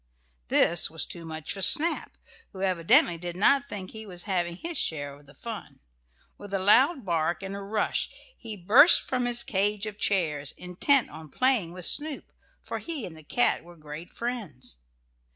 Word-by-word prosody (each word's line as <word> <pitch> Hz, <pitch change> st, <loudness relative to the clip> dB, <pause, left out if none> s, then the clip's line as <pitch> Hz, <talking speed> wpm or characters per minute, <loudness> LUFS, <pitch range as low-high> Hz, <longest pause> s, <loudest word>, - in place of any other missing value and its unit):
This 170 Hz, -, +4 dB
was 160 Hz, -, -1 dB
too 170 Hz, -1 st, -7 dB
much 160 Hz, -1 st, -4 dB
for 195 Hz, -, -6 dB
Snap, 325 Hz, -, +3 dB, 0.4 s
who 190 Hz, 0 st, -6 dB
evidently 170 Hz, -2 st, +3 dB
did 175 Hz, 0 st, -6 dB
not 275 Hz, +8 st, +3 dB
think 190 Hz, -5 st, -6 dB
he 220 Hz, -1 st, -9 dB
was 180 Hz, -2 st, -7 dB
having 175 Hz, -3 st, -2 dB
his 335 Hz, -, -6 dB
share 145 Hz, -, -1 dB
of 145 Hz, 0 st, -18 dB
the 140 Hz, -, -17 dB
fun. 225 Hz, -, -8 dB, 0.6 s
With 205 Hz, -1 st, -10 dB
a -, -, +2 dB
loud 250 Hz, -, +3 dB
bark 170 Hz, +1 st, -1 dB
and 195 Hz, +1 st, -5 dB
a -, -, -5 dB
rush 205 Hz, +2 st, -1 dB, 0.3 s
he 220 Hz, -3 st, -8 dB
burst 220 Hz, -, +7 dB
from 250 Hz, -1 st, -2 dB
his 240 Hz, -1 st, +1 dB
cage 205 Hz, +1 st, -1 dB
of 215 Hz, -1 st, -7 dB
chairs, 150 Hz, -8 st, 0 dB
intent 185 Hz, +10 st, +1 dB
on 160 Hz, -1 st, -10 dB
playing 250 Hz, -, +1 dB
with 180 Hz, -1 st, -3 dB
Snoop, 300 Hz, -1 st, 0 dB, 0.3 s
for -, -, -6 dB
he 315 Hz, -9 st, -4 dB
and 165 Hz, -, -9 dB
the 160 Hz, -, -12 dB
cat 245 Hz, +11 st, 0 dB
were 175 Hz, 0 st, -15 dB
great 155 Hz, +2 st, -9 dB
friends. 205 Hz, -, -6 dB
190 Hz, 180 wpm, -27 LUFS, 165-235 Hz, 0.6 s, burst